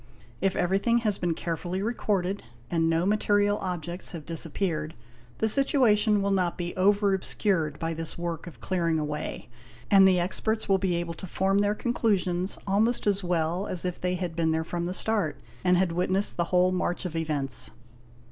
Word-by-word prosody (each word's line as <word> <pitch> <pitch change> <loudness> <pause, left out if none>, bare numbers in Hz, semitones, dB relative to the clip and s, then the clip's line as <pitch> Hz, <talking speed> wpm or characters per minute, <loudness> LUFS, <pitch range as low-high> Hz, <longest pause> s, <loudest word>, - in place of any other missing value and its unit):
If 195 0 +1
everything 195 +6 +2
has 210 -2 0
been 175 -2 0
carefully 175 +3 -3
recorded 200 -4 -1 0.3
and 165 -1 +2
no 165 +2 +1
material 205 0 +2
objects 175 0 -3
have 160 -4 -7
dis 165 -1 -2
appeared, 155 -2 -2 0.4
the 220 - +1
situation 215 -5 +4
will 200 - +1
not 185 -3 0
be 175 -1 -4
over 200 +1 +3
obscured 180 -5 0
by 165 +1 -2
this 165 0 -5
work 170 0 -4
of 170 - -11
clearing 170 -3 0
away, 150 -1 -4 0.4
and 195 -1 +8
the 185 -1 +4
experts 220 +5 -1
will 195 -1 +3
be 185 -2 0
able 170 0 -3
to 190 +3 -8
form 195 +3 +1
their 205 +1 +2
conclusions 195 -6 0
almost 215 +5 +2
as 200 -1 +1
well 175 +2 0
as 185 -1 -3
if 180 -1 -3
they 180 0 0
had 175 -2 -4
been 165 -1 +1
there 160 0 0
from 170 +1 -3
the 180 - -2
start 205 -10 +1 0.2
and 180 -1 +4
had 185 -1 +2
witnessed 185 +3 +1
the 170 - 0
whole 180 +1 +3
march 180 0 -2
of 170 -2 -4
events. 140 -6 -2
180 Hz, 185 wpm, -27 LUFS, 170-200 Hz, 0.4 s, and